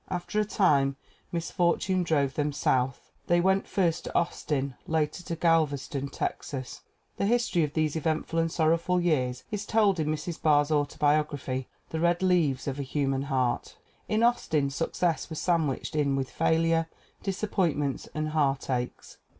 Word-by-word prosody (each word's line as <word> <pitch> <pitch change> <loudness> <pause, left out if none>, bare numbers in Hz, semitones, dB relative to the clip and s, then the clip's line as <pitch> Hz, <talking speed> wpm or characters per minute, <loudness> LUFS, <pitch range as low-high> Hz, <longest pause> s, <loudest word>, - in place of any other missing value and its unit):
After 180 +3 -2
a 210 - +2
time 145 -10 +2 0.4
misfortune 175 +2 +1
drove 145 -5 +1
them 150 0 0
South. 130 -2 0 0.2
They 175 0 +4
went 190 +2 +2
first 175 -4 0
to - - -7
Austin, 140 -5 -1
later 160 +2 0
to 170 -1 -4
Galveston, 150 -4 +1
Texas. 135 -1 -4 0.4
The 200 - +1
history 230 -7 +2
of 150 -1 -2
these 155 -1 +1
eventful 160 +1 -1
and 165 0 +1
sorrowful 165 +2 +2
years 130 -7 0
is 210 -1 -2
told 210 -4 +2
in 155 - 0
Mrs. 155 +2 -3
Barr's 145 -1 +3
autobiog 150 0 +2
raphy, 130 -2 -4 0.2
The 160 - -2
Red 175 +2 +2
Leaves 165 -9 +2
of 140 0 -3
a - - 0
Human 135 -1 -1
Heart. 130 -3 -1 0.3
In 215 +2 +2
Austin 155 -12 +2
success 165 +3 -1
was 160 - -5
sandwiched 160 -4 0
in 140 -2 +2
with 135 -1 -2
failure, 165 0 +2 0.3
disappointments 180 -8 -1
and 155 0 -1
heartaches. 135 -4 -1
155 Hz, 150 wpm, -28 LUFS, 140-175 Hz, 0.4 s, They